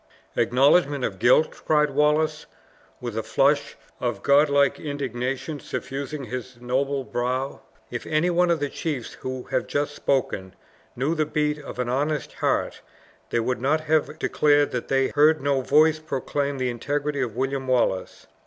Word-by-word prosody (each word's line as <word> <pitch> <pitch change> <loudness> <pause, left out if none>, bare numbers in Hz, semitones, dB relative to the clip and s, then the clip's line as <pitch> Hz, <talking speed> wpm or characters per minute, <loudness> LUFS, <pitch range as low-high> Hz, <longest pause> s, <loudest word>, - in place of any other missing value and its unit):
"Acknowledgment 140 +2 +3
of 95 - -4
guilt!" 130 +8 +3
cried 150 -1 +3
Wallace, 150 +2 +1 0.5
with 120 -3 -5
a 110 - 0
flush 140 +4 +1 0.2
of 120 -5 -2
god 145 +2 +5
like 140 0 +3
indignation 135 0 -3
suffusing 140 +2 -5
his 125 -1 -7
noble 135 +3 -1
brow. 130 +3 -2 0.3
"If 120 - -5
any 155 +3 +2
one 175 +1 +3
of 170 -2 +2
the 145 - -1
chiefs 140 -8 -4
who 130 -1 -5
have - - 0
just 145 0 -1
spoken 105 -11 -1 0.4
knew 135 +6 0
the 155 -2 0
beat 150 0 0
of 145 - -9
an 125 -1 -1
honest 145 +4 -1
heart, - - -1 0.5
they 120 - +1
would 125 +1 -2
not 150 +4 +2
have 155 0 0
declared 145 -1 +2
that 125 - -3
they 135 -1 +2
heard 155 +2 +4
no 140 -1 +1
voice 155 +4 +4
proclaim 140 -1 -2
the 130 -1 -1
integrity 145 +4 -2
of 120 -4 -3
William 135 +1 -2
Wallace. 120 -7 0
140 Hz, 160 wpm, -24 LUFS, 125-150 Hz, 0.5 s, god